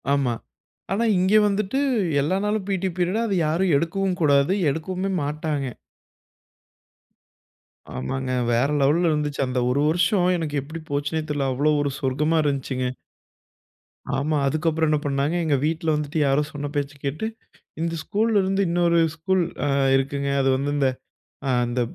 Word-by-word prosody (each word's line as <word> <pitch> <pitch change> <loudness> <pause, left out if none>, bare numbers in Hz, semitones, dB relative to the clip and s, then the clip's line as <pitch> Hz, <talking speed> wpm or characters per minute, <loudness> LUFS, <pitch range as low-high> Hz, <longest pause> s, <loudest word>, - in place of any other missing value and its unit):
ஆமா. 135 -4 +1 0.6
ஆனா, 215 +4 +1
இங்க 185 +3 +2
வந்துட்டு 205 +5 -1 0.4
எல்லா 160 +7 0
நாளும் 210 -1 -1
பிடீ 190 -1 0
பீரியட் 185 +5 +1
அத 210 - -1
யாரும் 170 +3 +1
எடுக்கவும் 185 +4 -1
கூடாது 140 +2 +4 0.2
எடுக்கவுமே 185 +6 -3
மாட்டாங்க. 150 -1 -2 2.3
ஆமாங்க. 130 - -3 0.2
வேற 120 +3 +3
லெவல்ல 165 +5 +3
இருந்ததுச்சு. 150 -2 -1
அந்த 125 0 -1
1 135 +3 +1
வருஷம் 175 +3 +2
எனக்கு 150 -3 -2
எப்டி 155 +4 -8
போச்சுன்னே 145 +3 -1
தெரியல. 145 -2 0
அவ்வளோ 145 +4 +2
ஒரு 145 -1 -1
சொர்க்கமா 150 +5 +1
இருஞ்சுங்க. 135 -2 -1 1.3
ஆமா. 150 +3 0
அதுக்கப்புறம் 160 +2 +1
என்ன 150 -1 +2
பண்ணாங்க 140 +3 0
எங்க 150 -3 +2
வீட்ல 160 +1 -1
வந்துட்டு 150 +1 -2
யாரோ 135 +2 +3
சொன்ன 145 0 -4
பேச்ச 145 0 -1
கேட்டு, 150 +9 -2 0.6
இந்த 165 0 -1
ஸ்கூலருந்து 200 -2 +1
இன்னொரு 170 0 +3 0.2
ஸ்கூல் 185 +3 +1 0.2
அ - - +1 0.3
இருக்குங்க 140 +1 -1
அ - - +2
அது 135 - +2
வந்து 140 +2 -2
இந்த 140 -2 +3 0.6
அ - - +2 0.2
இந்த 120 +1 -1
155 Hz, 140 wpm, -23 LUFS, 140-175 Hz, 2.3 s, கூடாது